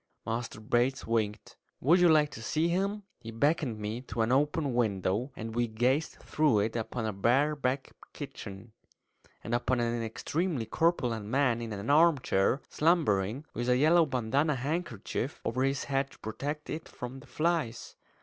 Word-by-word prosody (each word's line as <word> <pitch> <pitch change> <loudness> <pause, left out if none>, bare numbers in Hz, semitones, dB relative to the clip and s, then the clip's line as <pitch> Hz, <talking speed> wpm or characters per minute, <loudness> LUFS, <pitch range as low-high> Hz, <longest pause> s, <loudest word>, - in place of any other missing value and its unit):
Master 115 -1 -3
Bates 120 +4 +1
winked. 110 -2 -2 0.2
"Would 165 +8 +4
you 175 -1 +6
like 150 -2 +4
to 110 - -8
see 155 +8 0
him?" 200 +4 -1 0.2
He 115 - -9
beckoned 130 +1 +1
me 105 +3 -4
to 115 0 0
an 110 - 0
open 145 +1 +1
window, 110 +1 0
and 110 0 -6
we 120 +1 +1
gazed 125 +8 +1
through 150 -7 +1
it 110 +2 -1
upon 115 0 -3
a 110 - -2
bare 130 +10 +2
back 135 -1 -2 0.2
kitchen, 100 +3 -8 0.7
and 115 - -4
upon 120 +1 +1
an 120 0 0
extremely 140 +5 -2
corpulent 120 -6 0
man 125 -1 +2
in 115 -1 -5
an 105 +5 -2
armchair, 145 - +3
slumbering, 135 - +1
with 120 +1 -2
a 125 - +4
yellow 160 +4 +5
bandanna 135 +4 +1
handkerchief 135 - -3
over 125 +3 -1
his 135 +1 +1
head 135 0 -1
to - - -17
protect 145 +8 -5
it 160 +1 -5
from 125 +2 -7
the 140 - -16
flies. 155 -3 -1
125 Hz, 165 wpm, -30 LUFS, 115-150 Hz, 0.7 s, you